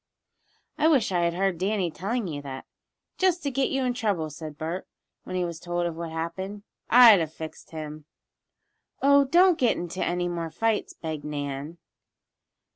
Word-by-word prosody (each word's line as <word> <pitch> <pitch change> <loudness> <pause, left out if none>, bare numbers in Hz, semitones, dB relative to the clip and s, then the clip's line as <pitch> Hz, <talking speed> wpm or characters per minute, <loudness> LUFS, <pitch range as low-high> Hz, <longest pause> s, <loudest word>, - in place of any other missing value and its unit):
"I 305 - +4
wish 270 -11 +3
I 175 -2 +2
had 170 0 0
heard 190 -2 0
Danny 190 -2 0
telling 215 +7 -2
you 145 -4 -5
that 135 -2 -7 0.5
just 365 -3 +2
to 280 - -1
get 270 +1 +1
you 270 -1 0
in 250 -1 +1
trouble," 200 -10 -1
said 155 0 -8
Bert, 165 +4 -4 0.4
when 185 - -5
he 180 -1 +1
was 170 -2 -5
told 175 0 -2
of 170 -1 -2
what 170 0 -5
had 160 - -7
happened. 190 +5 -4 0.3
"I'd 235 -4 +9
have 160 -2 -2
fixed 160 -1 -8
him." 155 -1 -7 1.0
"Oh, 280 0 +6
don't 350 +4 +5
get 245 - +3
into 175 +2 -3
any 175 0 0
more 170 -2 -3
fights," 225 +5 -1
begged 160 -2 -5
Nan. 145 +1 -5
175 Hz, 180 wpm, -26 LUFS, 160-225 Hz, 1.0 s, I'd